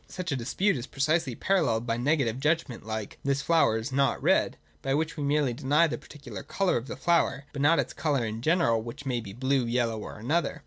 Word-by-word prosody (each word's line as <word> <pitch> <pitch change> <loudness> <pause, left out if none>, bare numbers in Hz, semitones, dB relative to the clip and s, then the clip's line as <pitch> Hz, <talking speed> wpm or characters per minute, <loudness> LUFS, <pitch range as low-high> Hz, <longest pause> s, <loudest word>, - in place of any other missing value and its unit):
Such 185 -3 -5
a - - +1
dispute 145 - 0
is 125 - -6
precisely 140 -2 0
paralleled 120 -13 +1
by 115 - 0
a - - -2
negative 130 -3 +1
judg 160 +4 +1
ment, 125 - -9
like, 110 -1 -5
' - - -37
This 140 0 0
flower 160 -9 +3
is 115 +3 -4
not 135 +1 +2
red: - - +2
' 75 - -35
by 135 0 0
which 160 +1 -1
we 155 - -5
merely 140 -3 +1
deny 145 +7 +3
the 160 - -3
particular 125 -10 -9
colour 195 -2 0
of 120 +2 -2
the - - -6
flower, 165 -5 +1
but 140 - -3
not 160 +4 +5
its - - -1
colour 140 -6 0
in 110 +1 -4
general, 155 -7 +2
which 120 +6 -8
may 125 -3 -1
be 100 -3 -9
blue, 130 +4 +1
yellow, 115 -2 0
or - - -8
any 115 +7 -5
other. 170 0 0
135 Hz, 250 wpm, -28 LUFS, 115-155 Hz, -, not